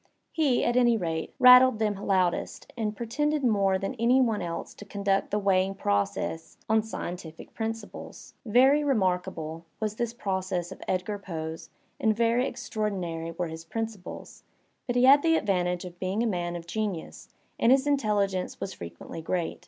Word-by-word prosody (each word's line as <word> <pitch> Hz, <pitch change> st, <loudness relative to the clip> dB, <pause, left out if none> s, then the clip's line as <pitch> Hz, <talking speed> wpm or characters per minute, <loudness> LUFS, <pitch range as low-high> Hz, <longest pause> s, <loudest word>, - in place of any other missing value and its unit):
He, 290 Hz, -7 st, +2 dB
at 240 Hz, -, +1 dB
any 240 Hz, -2 st, +4 dB
rate, 165 Hz, -4 st, -3 dB
rattled 250 Hz, -1 st, +8 dB
them 215 Hz, -1 st, +1 dB
loudest, 190 Hz, -3 st, -1 dB
and 215 Hz, -3 st, -2 dB
pretended 295 Hz, +5 st, -1 dB
more 200 Hz, -5 st, +3 dB
than 195 Hz, +6 st, -3 dB
any 245 Hz, +3 st, +4 dB
one 225 Hz, -5 st, +2 dB
else 170 Hz, -1 st, -5 dB
to -, -, -11 dB
conduct 200 Hz, -1 st, -1 dB
the 210 Hz, -, 0 dB
weighing 195 Hz, -1 st, +2 dB
process 100 Hz, -, -2 dB
on 220 Hz, 0 st, +3 dB
scientific 175 Hz, -6 st, -7 dB
principles. 225 Hz, -1 st, -6 dB
Very 265 Hz, +6 st, +4 dB
remarkable* 180 Hz, -, -1 dB, 0.2 s
was 215 Hz, -1 st, -2 dB
this 235 Hz, -1 st, -1 dB
process 190 Hz, -5 st, -3 dB
of -, -, -10 dB
Edgar 185 Hz, +3 st, -1 dB
Poe's 160 Hz, -4 st, -6 dB, 0.3 s
and 215 Hz, -1 st, +2 dB
veiy 235 Hz, +2 st, +2 dB
extraordinary 195 Hz, -9 st, -3 dB
were 170 Hz, +1 st, -3 dB
his 160 Hz, 0 st, -8 dB
principles; 220 Hz, +1 st, -6 dB, 0.5 s
but 245 Hz, -, -1 dB
he 245 Hz, -, +3 dB
had 275 Hz, +2 st, +8 dB
the 325 Hz, +1 st, +3 dB
advantage 180 Hz, -, 0 dB
of 175 Hz, -1 st, -10 dB
being 190 Hz, +5 st, -1 dB
a -, -, +1 dB
man 175 Hz, -5 st, -2 dB
of 170 Hz, -1 st, -7 dB
genius 195 Hz, -2 st, -4 dB, 0.3 s
and 230 Hz, -, +4 dB
his 265 Hz, +1 st, +4 dB
intelligence 205 Hz, -9 st, 0 dB
was 195 Hz, -, -4 dB
frequently 85 Hz, -, -8 dB
great. 170 Hz, +1 st, -2 dB
200 Hz, 160 wpm, -27 LUFS, 175-235 Hz, 0.5 s, rattled